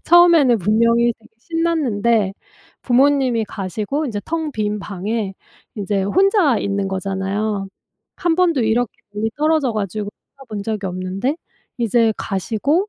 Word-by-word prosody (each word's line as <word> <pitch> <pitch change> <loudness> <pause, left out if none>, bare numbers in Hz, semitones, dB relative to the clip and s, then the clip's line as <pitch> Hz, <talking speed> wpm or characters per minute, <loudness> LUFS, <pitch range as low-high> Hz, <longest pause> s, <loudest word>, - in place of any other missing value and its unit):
처음에는 335 -8 +6
분명히 230 +4 +3
되게 225 0 -21
신났는데 240 - +1 0.5
부모님이 255 -2 +3
가시고 210 - -3
이제 210 -5 -3
텅 320 -2 -2
빈 210 -2 -1
방에 205 +1 -3 0.4
인제 200 -1 -1
혼자 370 - +3
있는 200 -1 -1
거잖아요. 195 +1 -2 0.5
한 345 -2 +1
번도 340 -8 +3
이렇게 225 +1 +1 0.2
멀리 220 +2 -1
떨어져 305 -4 +2
가지고 205 0 -3 0.3
살아본 225 -7 -7
적이 210 -2 -3
없는데 185 - -2 0.4
이제 230 -1 +3
가시고 235 - -1
225 Hz, 295 characters per minute, -20 LUFS, 200-280 Hz, 0.5 s, 처음에는